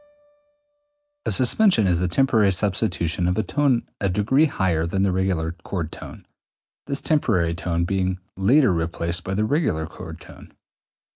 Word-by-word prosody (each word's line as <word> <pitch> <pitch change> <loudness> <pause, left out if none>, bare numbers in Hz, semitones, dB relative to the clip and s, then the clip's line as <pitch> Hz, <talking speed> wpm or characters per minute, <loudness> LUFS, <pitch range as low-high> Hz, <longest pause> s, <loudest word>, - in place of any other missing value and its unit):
A - - +1
suspension 130 - +3
is 90 -2 +2
the 90 - 0
temporary 110 0 +2
substitution 90 -3 0
of 90 - 0
a 110 - +1
tone 135 -4 0
a 100 - 0
degree 110 - +2
higher 90 - 0
than 95 +3 0
the 100 - +2
regular 90 -3 -1
chord 85 -5 -4
tone, - - -11 0.6
this 140 -1 -3
temporary 95 - +1
tone 85 0 -2
being 95 0 -1 0.2
later 120 +4 +3
replaced 85 +1 -1
by 95 - -3
the 105 +2 +1
regular 120 - 0
chord 80 0 -10
tone. - - -15
95 Hz, 150 wpm, -23 LUFS, 85-115 Hz, 0.6 s, suspension